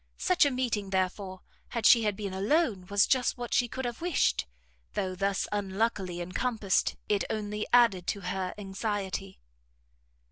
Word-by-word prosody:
Such 360 Hz, -5 st, +3 dB
a -, -, +2 dB
meeting, 240 Hz, -6 st, -1 dB
therefore, 185 Hz, 0 st, -2 dB, 0.3 s
had 230 Hz, -3 st, -3 dB
she 230 Hz, -3 st, +7 dB
been 200 Hz, -1 st, -5 dB
alone, 205 Hz, -, +1 dB
was 200 Hz, 0 st, +4 dB
just 255 Hz, -2 st, +1 dB
what 240 Hz, -1 st, -5 dB
she 245 Hz, -, +3 dB
could 260 Hz, +2 st, -5 dB
have 240 Hz, +2 st, -4 dB
wished, 335 Hz, -, +1 dB, 0.5 s
though, 185 Hz, -1 st, -1 dB
thus 195 Hz, +1 st, -1 dB
unluckily 195 Hz, -3 st, -1 dB
encompassed, 200 Hz, +2 st, 0 dB
it 205 Hz, -2 st, +1 dB
only 210 Hz, 0 st, -3 dB
added 230 Hz, -8 st, +4 dB
to 200 Hz, -, -1 dB
her 185 Hz, 0 st, -3 dB
anxiety. 195 Hz, -1 st, -4 dB
205 Hz, 145 wpm, -29 LUFS, 190-235 Hz, 0.5 s, she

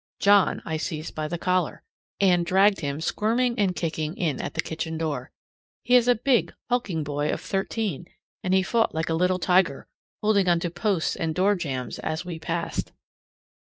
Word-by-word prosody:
John 200 Hz, -1 st, +4 dB
I 160 Hz, -1 st, -2 dB
seized 155 Hz, 0 st, -4 dB
by 155 Hz, -1 st, -3 dB
the 170 Hz, +3 st, -3 dB
collar; 180 Hz, +1 st, 0 dB, 0.4 s
and 180 Hz, -3 st, +4 dB
dragged 195 Hz, +3 st, +4 dB
him 145 Hz, 0 st, -3 dB
squirming 235 Hz, +7 st, 0 dB
and 190 Hz, -3 st, +2 dB
kicking 155 Hz, -1 st, -3 dB
in 160 Hz, -6 st, -1 dB
at -, -, -5 dB
the -, -, +1 dB
kitchen 160 Hz, 0 st, -4 dB
door. 145 Hz, -6 st, -3 dB, 0.5 s
He 245 Hz, -, +4 dB
is 245 Hz, -1 st, +5 dB
a 245 Hz, -, +5 dB
big, 245 Hz, +1 st, +1 dB
hulking 210 Hz, -10 st, 0 dB
boy 145 Hz, 0 st, -2 dB
of -, -, -1 dB
thirteen, 195 Hz, -4 st, -2 dB, 0.4 s
and 185 Hz, -, -1 dB
he 190 Hz, -, +4 dB
fought 225 Hz, -2 st, +1 dB
like 160 Hz, +1 st, -1 dB
a -, -, +1 dB
little 180 Hz, +2 st, +2 dB
tiger, 180 Hz, -5 st, +2 dB, 0.3 s
holding 200 Hz, -3 st, +2 dB
on 170 Hz, -1 st, +4 dB
to 175 Hz, -, -2 dB
posts 180 Hz, -1 st, 0 dB
and 160 Hz, -1 st, -2 dB
doorjambs 175 Hz, -, 0 dB
as 160 Hz, +3 st, -3 dB
we 170 Hz, -2 st, -6 dB
passed. 165 Hz, +1 st, -3 dB
175 Hz, 180 wpm, -25 LUFS, 160-200 Hz, 0.5 s, is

